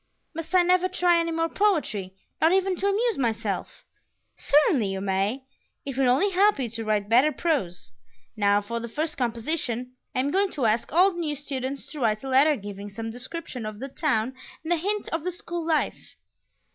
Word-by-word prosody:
"Must 330 Hz, +3 st, -4 dB
I 360 Hz, -, +6 dB
never 365 Hz, +1 st, +3 dB
try 355 Hz, -2 st, +3 dB
any 335 Hz, 0 st, 0 dB
more 330 Hz, 0 st, 0 dB
poetry, 295 Hz, -, 0 dB, 0.3 s
not 320 Hz, -, +5 dB
even 380 Hz, 0 st, +2 dB
to 395 Hz, -, 0 dB
amuse 435 Hz, 0 st, +1 dB
myself?" 230 Hz, -3 st, -2 dB, 0.5 s
"Certainly 285 Hz, -6 st, +3 dB
you 195 Hz, 0 st, -3 dB
may; 195 Hz, +6 st, -1 dB, 0.4 s
it 275 Hz, -2 st, -4 dB
will 265 Hz, -1 st, +3 dB
only 295 Hz, +11 st, +3 dB
help 400 Hz, +1 st, +4 dB
you 250 Hz, -5 st, -3 dB
to 230 Hz, 0 st, -4 dB
write 210 Hz, -2 st, 0 dB
better 250 Hz, +7 st, +5 dB
prose. 195 Hz, -, -2 dB, 0.4 s
Now 205 Hz, -1 st, +3 dB
for 235 Hz, +3 st, -4 dB
the 235 Hz, 0 st, -6 dB
first 310 Hz, +6 st, -2 dB
composition. 245 Hz, 0 st, -2 dB, 0.2 s
I 255 Hz, -, +2 dB
am 280 Hz, +2 st, -1 dB
going 390 Hz, +3 st, +2 dB
to 270 Hz, -5 st, -1 dB
ask 220 Hz, +1 st, +1 dB
all 365 Hz, +6 st, +5 dB
the 350 Hz, -, -7 dB
new 305 Hz, -3 st, -1 dB
students 275 Hz, -1 st, -4 dB
to 305 Hz, -, -7 dB
write 215 Hz, -3 st, +1 dB
a 270 Hz, -, -5 dB
letter 280 Hz, +4 st, +5 dB
giving 205 Hz, -2 st, -7 dB
some 225 Hz, +2 st, -5 dB
description 255 Hz, +1 st, -6 dB
of 215 Hz, -1 st, -5 dB
the 270 Hz, +5 st, -6 dB
town 260 Hz, -5 st, 0 dB, 0.3 s
and 330 Hz, +2 st, +1 dB
a -, -, +1 dB
hint 410 Hz, +5 st, -1 dB
of 325 Hz, -2 st, -2 dB
the 365 Hz, -, -1 dB
school 345 Hz, -1 st, -5 dB
life." 315 Hz, -2 st, -1 dB
275 Hz, 195 wpm, -26 LUFS, 225-335 Hz, 0.5 s, I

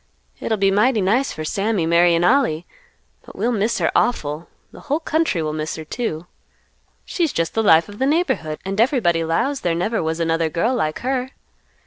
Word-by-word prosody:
It'll 220 Hz, -, -1 dB
be 195 Hz, -1 st, +2 dB
mighty 215 Hz, +4 st, +3 dB
nice 225 Hz, +8 st, +1 dB
for 155 Hz, -, -6 dB
Sammy, 195 Hz, +1 st, -1 dB
marryin' 170 Hz, 0 st, +3 dB
Ollie, 180 Hz, -, +2 dB, 0.6 s
but -, -, -14 dB
we'll 240 Hz, -, 0 dB
miss 220 Hz, 0 st, 0 dB
her -, -, +1 dB
awful; 155 Hz, -9 st, 0 dB, 0.2 s
the -, -, -13 dB
whole 295 Hz, +2 st, -2 dB
country 315 Hz, -, 0 dB
will 155 Hz, 0 st, -2 dB
miss 155 Hz, 0 st, -3 dB
her, 160 Hz, -, -8 dB
too. 165 Hz, -4 st, -4 dB, 0.8 s
She's 335 Hz, -5 st, -1 dB
just 165 Hz, 0 st, -2 dB
the 225 Hz, -, +1 dB
life 165 Hz, -6 st, +5 dB
of 205 Hz, 0 st, -12 dB
the 265 Hz, -, +1 dB
neighborhood, 265 Hz, -, 0 dB
and 195 Hz, +3 st, 0 dB
everybody 230 Hz, -, +2 dB
'lows 260 Hz, -, -1 dB
there 170 Hz, -2 st, 0 dB
never 210 Hz, +7 st, -1 dB
was 160 Hz, +1 st, -2 dB
another 165 Hz, -1 st, 0 dB
girl 180 Hz, +10 st, 0 dB
like 155 Hz, -11 st, -2 dB
her. 255 Hz, 0 st, -1 dB
195 Hz, 185 wpm, -20 LUFS, 165-245 Hz, 0.8 s, life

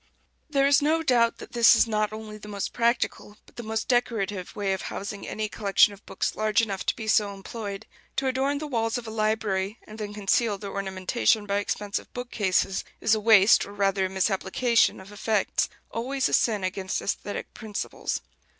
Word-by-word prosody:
There 275 Hz, -2 st, +3 dB
is 280 Hz, +1 st, +5 dB
no 320 Hz, +3 st, +2 dB
doubt 240 Hz, -5 st, +3 dB
that -, -, -11 dB
this 235 Hz, -1 st, +6 dB
is -, -, +5 dB
not 215 Hz, -1 st, 0 dB
only 215 Hz, -1 st, -8 dB
the 210 Hz, -, -11 dB
most 200 Hz, -1 st, -4 dB
practical, 235 Hz, -3 st, 0 dB
but -, -, -21 dB
the -, -, -6 dB
most 220 Hz, -1 st, -3 dB
decorative, 220 Hz, -7 st, -1 dB
way 200 Hz, -2 st, 0 dB
of 190 Hz, -, -3 dB
housing 200 Hz, 0 st, -6 dB
any 215 Hz, 0 st, -2 dB
collection 205 Hz, -1 st, +3 dB
of 200 Hz, -, -15 dB
books -, -, -2 dB
large 215 Hz, 0 st, +2 dB
enough 200 Hz, -4 st, -1 dB
to -, -, +2 dB
be 220 Hz, -2 st, -6 dB
so 210 Hz, -2 st, +2 dB
employed. 200 Hz, 0 st, -6 dB, 0.3 s
To 270 Hz, -, 0 dB
adorn 265 Hz, +2 st, +1 dB
the 305 Hz, -, -4 dB
walls 225 Hz, -5 st, -1 dB
of 245 Hz, -, -6 dB
a 220 Hz, -, -6 dB
library, 215 Hz, -2 st, -1 dB
and 215 Hz, +1 st, -11 dB
then 210 Hz, -1 st, -4 dB
conceal 205 Hz, +1 st, +1 dB
their 200 Hz, -1 st, -7 dB
ornamentation 200 Hz, +3 st, 0 dB
by 200 Hz, 0 st, 0 dB
expensive 205 Hz, 0 st, -3 dB
bookcases, 205 Hz, -6 st, 0 dB, 0.2 s
is 220 Hz, -, +3 dB
a 220 Hz, -, +2 dB
waste, 210 Hz, -1 st, +6 dB
or 200 Hz, -, -10 dB
rather 195 Hz, -1 st, +1 dB
a -, -, -10 dB
misapplication, 195 Hz, +5 st, +2 dB
of 190 Hz, +2 st, -12 dB
effects 210 Hz, 0 st, 0 dB, 0.2 s
always 260 Hz, +4 st, -1 dB
a -, -, -5 dB
sin 215 Hz, -4 st, +2 dB
against 190 Hz, 0 st, -2 dB
æsthetic 205 Hz, 0 st, -4 dB
principles. 210 Hz, -2 st, -4 dB
215 Hz, 190 wpm, -26 LUFS, 200-230 Hz, 0.3 s, this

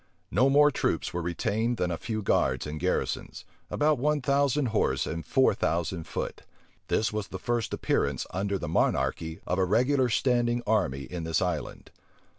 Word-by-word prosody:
No 125 Hz, +8 st, +4 dB
more 145 Hz, +1 st, +6 dB
troops -, -, -1 dB
were 90 Hz, -, -2 dB
retained 105 Hz, +8 st, -1 dB
than 90 Hz, -3 st, 0 dB
a -, -, 0 dB
few 110 Hz, -2 st, -3 dB
guards 65 Hz, -9 st, +1 dB
and 75 Hz, 0 st, -5 dB
garrisons, -, -, -2 dB, 0.2 s
about 150 Hz, -2 st, +2 dB
one 150 Hz, +3 st, +2 dB
thousand 140 Hz, 0 st, +1 dB
horse 110 Hz, -, +1 dB
and 80 Hz, 0 st, -4 dB
four -, -, +3 dB
thousand 85 Hz, 0 st, -1 dB
foot. -, -, -4 dB, 0.5 s
This 110 Hz, +2 st, +1 dB
was 105 Hz, -3 st, -3 dB
the 95 Hz, -, -6 dB
first 120 Hz, +3 st, -1 dB
appearance, 70 Hz, -3 st, 0 dB
under 100 Hz, +2 st, -1 dB
the 75 Hz, -, -5 dB
monarchy, 80 Hz, 0 st, 0 dB
of 90 Hz, -, -1 dB
a -, -, +4 dB
regular 125 Hz, +6 st, +2 dB
standing 120 Hz, 0 st, +1 dB
army 70 Hz, -, +1 dB
in 85 Hz, +5 st, -6 dB
this 80 Hz, -1 st, 0 dB
island. -, -, -3 dB
105 Hz, 170 wpm, -28 LUFS, 85-125 Hz, 0.5 s, more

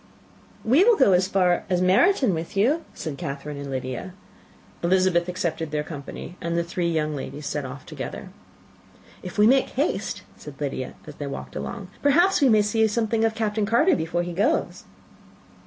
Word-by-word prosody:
"We 265 Hz, +11 st, +5 dB
will 470 Hz, +2 st, +6 dB
go 265 Hz, -8 st, +5 dB
as 180 Hz, +1 st, +3 dB
far 180 Hz, -2 st, +2 dB
as 180 Hz, -1 st, +2 dB
Meryton 200 Hz, -, +4 dB
with 165 Hz, +4 st, -5 dB
you," 275 Hz, +11 st, +2 dB
said 155 Hz, -4 st, -6 dB
Catherine 145 Hz, -2 st, -5 dB
and 140 Hz, 0 st, -6 dB
Lydia. 130 Hz, +7 st, -4 dB, 0.7 s
Elizabeth 180 Hz, -1 st, +2 dB
accepted 170 Hz, -3 st, -2 dB
their 150 Hz, 0 st, -1 dB
company, 150 Hz, +3 st, -8 dB
and 170 Hz, 0 st, -2 dB
the 170 Hz, -, +1 dB
three 170 Hz, 0 st, -2 dB
young 155 Hz, -2 st, -1 dB
ladies 145 Hz, +1 st, -6 dB
set 145 Hz, -1 st, -3 dB
off 130 Hz, +1 st, -8 dB
together. -, -, -7 dB, 0.9 s
"If 180 Hz, +2 st, -8 dB
we 210 Hz, -, +6 dB
make 265 Hz, +4 st, +4 dB
haste," 285 Hz, +6 st, -2 dB
said 150 Hz, -2 st, -11 dB
Lydia, 135 Hz, -3 st, -4 dB
as 150 Hz, -1 st, -11 dB
they 145 Hz, -, -4 dB
walked 140 Hz, -, -7 dB
along, 205 Hz, -6 st, -5 dB
"perhaps 340 Hz, +7 st, +4 dB
we 275 Hz, -, +5 dB
may 215 Hz, -2 st, +5 dB
see 220 Hz, +2 st, +2 dB
something 220 Hz, +1 st, 0 dB
of 225 Hz, -1 st, +1 dB
Captain 215 Hz, -2 st, -1 dB
Carter, 290 Hz, -, +4 dB
before 175 Hz, -3 st, -1 dB
he 175 Hz, 0 st, -5 dB
goes." 200 Hz, +6 st, 0 dB
180 Hz, 175 wpm, -24 LUFS, 155-225 Hz, 0.9 s, will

